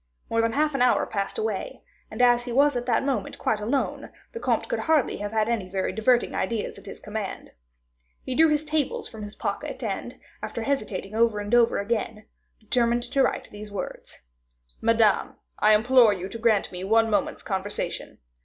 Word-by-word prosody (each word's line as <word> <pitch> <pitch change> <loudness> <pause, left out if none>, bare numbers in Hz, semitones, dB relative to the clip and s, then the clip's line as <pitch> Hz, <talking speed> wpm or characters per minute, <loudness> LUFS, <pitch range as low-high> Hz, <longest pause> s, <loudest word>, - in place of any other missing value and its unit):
More 230 - +3
than 230 0 0
half 300 +1 +1
an 275 - -1
hour 250 - +4
passed 200 -2 -3
away; 445 0 -3 0.3
and 250 - -1
as 240 0 +4
he 245 - -5
was 280 +3 +4
at 245 0 -3
that 235 0 +2
moment 275 -2 -2
quite 215 - 0
alone, 240 +7 -2 0.2
the 465 - -6
comte - - 0
could - - -2
hardly 315 -5 +2
have 205 0 -4
had 220 -1 +1
any 220 -6 -1
very 190 0 -1
diverting 235 +5 +2
ideas 230 -3 -2
at - - -15
his - - -8
command. 210 -1 -6 0.7
He 260 - -4
drew 320 +5 +5
his 300 0 +1
tables 300 -2 -1
from 220 -2 -10
his 205 0 -7
pocket, - - -4
and, - - -4 0.2
after 230 - -4
hesitating 215 -7 -2
over 225 -1 +2
and 205 +2 -5
over 235 -1 +5
again, 215 0 -2 0.3
determined 235 +2 +1
to 275 - 0
write - - 0
these 210 0 -9
words: 200 - -7 0.6
"Madame, - - +3 0.2
I 215 - +6
implore 235 0 +5
you 190 0 -5
to 230 - -7
grant 220 -3 +2
me 180 0 -6
one 225 +3 +3
moment's 215 - -1
conversation. 195 +1 -3
230 Hz, 190 wpm, -25 LUFS, 210-255 Hz, 0.7 s, I